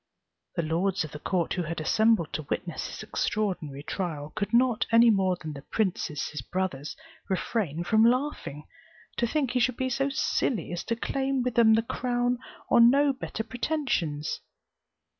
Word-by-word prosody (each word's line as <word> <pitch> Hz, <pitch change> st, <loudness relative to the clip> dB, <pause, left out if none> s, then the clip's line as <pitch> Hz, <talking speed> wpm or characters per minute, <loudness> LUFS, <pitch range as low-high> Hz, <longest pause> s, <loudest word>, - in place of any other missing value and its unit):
The 170 Hz, -, 0 dB
lords 175 Hz, +4 st, 0 dB
of 155 Hz, -, -7 dB
the 150 Hz, -, -8 dB
court, 175 Hz, +1 st, 0 dB
who 180 Hz, -, -1 dB
had 165 Hz, 0 st, -4 dB
assembled 215 Hz, +1 st, +2 dB
to 155 Hz, -3 st, -4 dB
witness 170 Hz, -3 st, -3 dB
this -, -, -7 dB
extraordinary 185 Hz, -10 st, -2 dB
trial, 155 Hz, -5 st, -4 dB
could 200 Hz, -, -2 dB
not, 240 Hz, -1 st, +3 dB
any 230 Hz, 0 st, +7 dB
more 190 Hz, -3 st, +2 dB
than 155 Hz, -2 st, -6 dB
the 140 Hz, -, -8 dB
princes 170 Hz, -6 st, -1 dB
his 150 Hz, -3 st, -5 dB
brothers, 150 Hz, -2 st, -3 dB, 0.3 s
refrain 185 Hz, -4 st, -1 dB
from 220 Hz, +5 st, +4 dB
laughing, 240 Hz, -, 0 dB, 0.5 s
to 235 Hz, -, +2 dB
think 275 Hz, -1 st, 0 dB
he 250 Hz, -, +1 dB
should 245 Hz, 0 st, +1 dB
be 260 Hz, 0 st, -1 dB
so 270 Hz, +3 st, +1 dB
silly 235 Hz, -, 0 dB
as 175 Hz, 0 st, -3 dB
to 230 Hz, -, 0 dB
claim 265 Hz, +2 st, -1 dB
with 250 Hz, -1 st, -1 dB
them 225 Hz, -2 st, +6 dB
the 225 Hz, -, +2 dB
crown 245 Hz, +1 st, -1 dB, 0.3 s
on 235 Hz, 0 st, +8 dB
no 280 Hz, +2 st, +4 dB
better 240 Hz, -3 st, -5 dB
pretensions. 235 Hz, -, -2 dB
215 Hz, 170 wpm, -27 LUFS, 165-245 Hz, 0.5 s, on